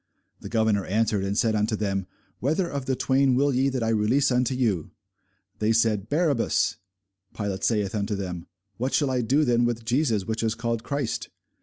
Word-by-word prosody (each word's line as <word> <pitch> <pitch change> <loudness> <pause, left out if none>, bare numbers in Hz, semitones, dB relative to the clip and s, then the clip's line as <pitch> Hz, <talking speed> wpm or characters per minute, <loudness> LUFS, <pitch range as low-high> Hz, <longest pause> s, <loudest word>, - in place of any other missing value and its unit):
The - - -8
governor 110 -3 +2
answered 105 0 0
and 100 +1 -2
said 115 -1 +2
unto 110 +1 +1
them, 100 -3 -2 0.3
Whether 160 +8 0
of 140 -5 -4
the 130 - +1
twain 130 0 +2
will 140 +2 +2
ye 130 +2 +2
that 130 -3 -2
I 115 - 0
release 115 +6 +2
unto 125 +1 +1
you? 110 - 0 0.7
They 110 +1 +2
said, 110 -2 +1
Barabbas. 150 -5 +1 0.6
Pilate 100 -3 -3
saith 105 -4 +1
unto 105 0 -1
them, 90 -3 -5 0.3
What 130 +3 -1
shall 145 -3 +2
I 125 -1 +1
do 140 +6 +2
then 120 -1 +3
with 120 -1 -1
Jesus 120 -5 +1
which 110 +1 -2
is 115 -1 0
called 115 0 -2
Christ? 140 -3 -3
115 Hz, 185 wpm, -25 LUFS, 105-130 Hz, 0.7 s, then